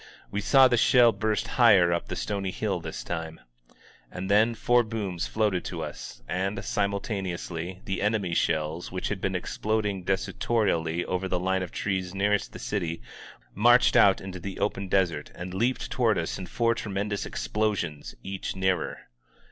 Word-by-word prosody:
We 105 - -2
saw 135 +5 +6
the 120 - +2
shell 120 0 +6
burst 105 0 -1
higher 100 -8 +5
up 85 - -2
the - - -4
stony 100 -2 -2
hill - - -2
this - - -6
time. 80 -1 -5 0.7
And 95 +2 -4
then 110 +3 +4
four 120 +1 +3
booms 105 -6 -3
floated 105 -5 0
to - - -4
us, - - -8
and, 95 +4 -2
simultaneously, 95 -3 -3
the 95 -1 -2
en 105 +2 +2
emy's 95 -6 -1
shells, 80 +2 -1
which 90 0 -3
had 100 -2 -3
been 95 -1 -1
exploding 105 +1 -1
desultorily 90 - 0
over 90 +1 -2
the 90 -1 -1
line 95 +1 0
of 90 - -5
trees 95 -2 -2
nearest 100 +1 +1
the - - -9
city, 85 -5 -3 0.5
marched 120 +4 +5
out 95 -1 +6
into 95 -1 -7
the 95 +2 -6
open 100 0 -1
desert 90 -6 0
and 90 +1 -6
leaped 120 +7 -1
toward 115 -5 +2
us 85 +3 -2
in 90 - -6
four 115 +4 +1
tremendous 100 -1 -3
explosions, 85 - -2
each 95 0 -4
nearer. 95 -3 -1
95 Hz, 165 wpm, -27 LUFS, 90-105 Hz, 0.7 s, saw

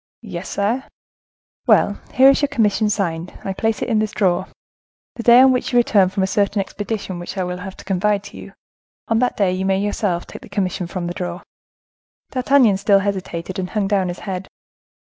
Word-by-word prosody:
"Yes, 185 -4 -6
sire." 220 +6 -1 0.8
"Well, 205 - +4 0.2
here 260 +1 +7
is 275 - 0
your 285 - +1
commission 220 -5 +1
signed. 175 -4 -2
I 195 - -2
place 220 +3 -1
it - - -3
in 225 -3 +2
this 215 -1 -1
drawer. 180 -4 +1 0.7
The - - -5
day 240 +2 +7
on 265 0 +7
which 250 - -1
you 245 - +2
return 205 -6 +4
from 190 0 -1
a - - +3
certain 200 +1 0
expedition 200 -2 -4
which 175 +3 -7
I 185 - 0 0.2
have 190 0 -8
to - - -13
confide 200 +2 0
to 200 - -11
you, 195 - -11 0.6
on 225 0 +2
that 250 0 0
day 195 -3 +2
you 185 +1 -2
may 190 0 +1
yourself 200 -3 -1
take - - -11
the - - -13
commission 190 -3 -2
from 175 0 -4
the 175 - -3
drawer." 175 -1 -5 0.9
D'Artagnan 255 -5 +3
still 200 0 +4
hesitated, 185 -2 -4
and 180 -1 -3
hung 205 0 -1
down 195 -2 +1
his 175 0 -6
head. 190 -1 -4
200 Hz, 205 wpm, -20 LUFS, 185-215 Hz, 0.9 s, here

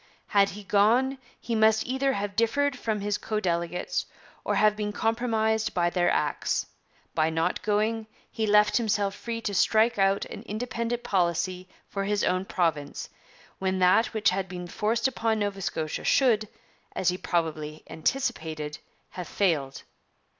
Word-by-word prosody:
'Had 200 -1 +4
he 210 - -9
gone, 235 +7 +3 0.2
he 235 - -4
must 220 0 +4
either 265 +2 0
have 200 -2 -3
differed 275 +5 +2
from 220 -4 -2
his 205 0 -1
co 215 -1 -2
delegates, 170 -2 -1 0.4
or - - 0
have 215 0 +4
been 210 -1 -2
compromised 220 0 0
by 175 -1 +2
their 175 -1 +2
acts. 150 -1 0 0.5
By 155 0 +2
not 160 0 0
going, 215 +1 0 0.2
he 220 -1 -1
left 210 0 +5
himself 205 -4 +1
free 230 +2 -5
to 205 - -3
strike 220 +4 +3
out 195 +1 +3
an - - -8
independent 235 +2 -3
policy 180 0 0 0.2
for 195 -1 -3
his 205 0 0
own 185 +1 +1
province, 160 -7 -1 0.5
when 190 0 0
that 185 +5 +4
which 220 -4 +1
had 190 0 -2
been 180 -1 -6
forced 225 +7 0
upon 225 -4 0
Nova 205 -2 -2
Scotia 155 -4 -3
should, 225 -6 +3 0.5
as 185 - +2
he 180 - -1
probably 155 -2 -2
anticipated, 155 - -2 0.3
have 180 -2 -6
failed.' 150 -9 0
205 Hz, 155 wpm, -27 LUFS, 180-225 Hz, 0.5 s, left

